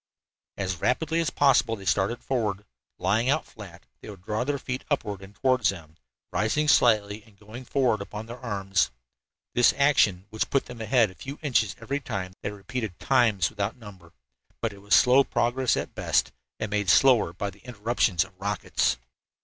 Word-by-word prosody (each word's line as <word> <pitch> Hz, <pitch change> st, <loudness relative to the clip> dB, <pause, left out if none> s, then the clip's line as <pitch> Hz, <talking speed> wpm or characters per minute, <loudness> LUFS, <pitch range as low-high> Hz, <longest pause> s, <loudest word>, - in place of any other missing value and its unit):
As 95 Hz, -3 st, -3 dB
rapidly 160 Hz, +6 st, +1 dB
as 165 Hz, -1 st, +1 dB
possible 125 Hz, -7 st, +3 dB
they 100 Hz, -3 st, -11 dB
started 100 Hz, +5 st, 0 dB
forward. 105 Hz, -6 st, -2 dB, 0.3 s
Lying 115 Hz, +5 st, +1 dB
out 155 Hz, +3 st, +1 dB
flat, 95 Hz, -6 st, -13 dB
they -, -, -11 dB
would 95 Hz, -3 st, -11 dB
draw 110 Hz, +4 st, -1 dB
their 140 Hz, +2 st, -1 dB
feet 130 Hz, -1 st, -5 dB
upward 105 Hz, -9 st, -2 dB
and 100 Hz, +1 st, -13 dB
toward 130 Hz, 0 st, +1 dB
them, 85 Hz, -5 st, -1 dB, 0.4 s
rising 110 Hz, +12 st, 0 dB
slightly 110 Hz, -6 st, +3 dB
and 105 Hz, -1 st, -23 dB
going 110 Hz, +5 st, -11 dB
forward 125 Hz, -6 st, +1 dB
upon 105 Hz, +2 st, -7 dB
their 120 Hz, +2 st, -9 dB
arms. 100 Hz, -5 st, 0 dB, 0.6 s
This 120 Hz, -, +4 dB
action, 115 Hz, -10 st, +3 dB
which 110 Hz, -, -2 dB
put 140 Hz, -, +1 dB
them 125 Hz, -2 st, -9 dB
ahead 110 Hz, -2 st, +3 dB
a -, -, -14 dB
few 135 Hz, +9 st, -8 dB
inches 115 Hz, -8 st, +1 dB
every 135 Hz, +5 st, -3 dB
time, 100 Hz, -9 st, -5 dB
they -, -, -3 dB
repeated 105 Hz, -1 st, -5 dB
times 115 Hz, -9 st, +2 dB
without 105 Hz, +2 st, -3 dB
number. 95 Hz, -7 st, -13 dB, 0.5 s
But 115 Hz, -2 st, -2 dB
it 100 Hz, -, -14 dB
was 100 Hz, 0 st, +3 dB
slow 130 Hz, +2 st, +6 dB
progress 120 Hz, +1 st, 0 dB
at -, -, -4 dB
best, -, -, +1 dB, 0.3 s
and 110 Hz, -2 st, -3 dB
made 105 Hz, -3 st, 0 dB
slower 125 Hz, -3 st, +5 dB
by 100 Hz, +3 st, -4 dB
the 100 Hz, -, -19 dB
interruptions 110 Hz, -6 st, 0 dB
of 95 Hz, -, -15 dB
the 90 Hz, -, -35 dB
rockets. 100 Hz, -1 st, 0 dB
110 Hz, 180 wpm, -26 LUFS, 100-125 Hz, 0.6 s, slow